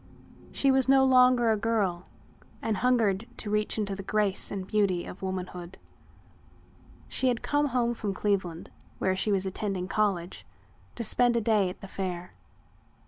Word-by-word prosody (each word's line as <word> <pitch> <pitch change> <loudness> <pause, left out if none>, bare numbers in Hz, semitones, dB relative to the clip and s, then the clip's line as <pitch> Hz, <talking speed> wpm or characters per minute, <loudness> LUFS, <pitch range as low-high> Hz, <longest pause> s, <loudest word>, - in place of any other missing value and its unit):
She 275 - +2
was 265 0 +3
no 270 0 +6
longer 250 -2 +5
a - - +3
girl 205 -5 -1 0.5
and 220 -3 -1
hungered 230 -3 +1
to 210 - -5
reach 210 +1 0
into 200 -2 -2
the 195 - -6
grace 205 0 0
and 195 -2 -4
beauty 195 -4 +1
of - - -10
womanhood. 180 -1 -5 1.3
She 260 - 0
had 245 -2 0
come 290 0 +1
home 240 -2 0
from 210 -3 -3
Cleveland, 190 -4 -2 0.3
where 190 0 0
she 200 +3 0
was 195 -1 +1
attending 190 -1 -3
college, 195 -4 -1 0.5
to 235 - -4
spend 240 +2 +3
a - - +3
day 210 -4 +2
at 180 - -10
the 195 - -8
Fair. 180 -2 -5
205 Hz, 160 wpm, -28 LUFS, 190-235 Hz, 1.3 s, no